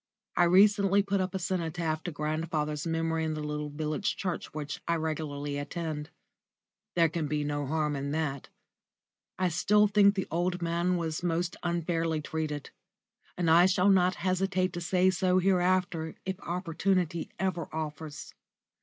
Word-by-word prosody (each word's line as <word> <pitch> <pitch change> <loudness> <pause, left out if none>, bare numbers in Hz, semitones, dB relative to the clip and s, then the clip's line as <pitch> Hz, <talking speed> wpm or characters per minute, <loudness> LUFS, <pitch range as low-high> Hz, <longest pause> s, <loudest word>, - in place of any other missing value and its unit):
I 175 - +5
recently 200 +2 +5
put 200 -1 0
up 185 +1 -3
a - - +2
cenotaph 165 -3 -2
to 175 - -2
grandfather's 150 0 -2
memory 165 0 0
in 155 -1 -1
the 155 - -4
little 150 0 -3
village 155 +6 -2
church 180 -4 -3
which 145 -2 -5
I 170 - +2
regularly 145 -3 -3
attend. 150 0 -4 0.9
There 170 -1 +5
can 160 -1 -2
be 150 0 -1
no 145 -1 -2
harm 150 0 0
in 140 0 -3
that. 145 -3 -2 0.9
I 185 -1 +1
still 210 +5 +4
think 200 -1 +5
the 190 - -1
old 175 +2 0
man 170 +1 0
was 160 -1 -2
most 175 0 -1
unfairly 165 -2 0
treated, 150 -1 -4 0.7
and 175 -2 0
I 170 +3 +7
shall 190 +1 +3
not 185 -1 +4
hesitate 185 0 +1
to 175 - -4
say 185 +1 +3
so 185 0 +2
hereafter 180 -3 +1
if 190 0 -3
opportunity 175 -1 -1
ever 180 -3 -2
offers. 155 -1 -6
170 Hz, 155 wpm, -29 LUFS, 155-185 Hz, 0.9 s, I